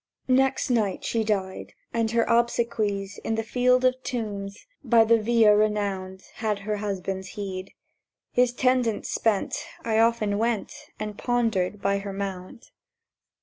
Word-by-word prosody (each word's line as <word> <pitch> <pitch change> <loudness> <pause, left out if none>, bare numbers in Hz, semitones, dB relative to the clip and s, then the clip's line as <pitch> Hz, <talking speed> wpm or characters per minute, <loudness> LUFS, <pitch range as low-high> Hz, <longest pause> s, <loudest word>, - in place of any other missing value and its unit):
Next 265 +1 +2
night 215 -5 0
she 225 -1 0
died; 195 -3 -2 0.2
and 230 -1 +1
her 230 0 +2
obsequies 230 -4 0
In 225 - -2
the 225 - -1
Field 250 +2 +2
of 255 0 +2
Tombs, 205 -6 -5 0.2
by 235 -3 +5
the 225 0 +3
Via 220 -1 +5
renowned, 200 -3 -1
Had 215 -2 -1
her 210 -1 -1
husband's 195 -2 -3
heed. 190 -2 -5 0.6
His 250 0 +3
tendance 245 -3 +1
spent, 220 -3 0 0.2
I 220 -1 +2
often 225 -3 +2
went 230 -2 -1 0.3
And 210 -1 -5
pondered 215 -5 0
by 200 0 +2
her 200 0 -6
mound. 195 +2 -6
215 Hz, 140 wpm, -25 LUFS, 200-235 Hz, 0.6 s, by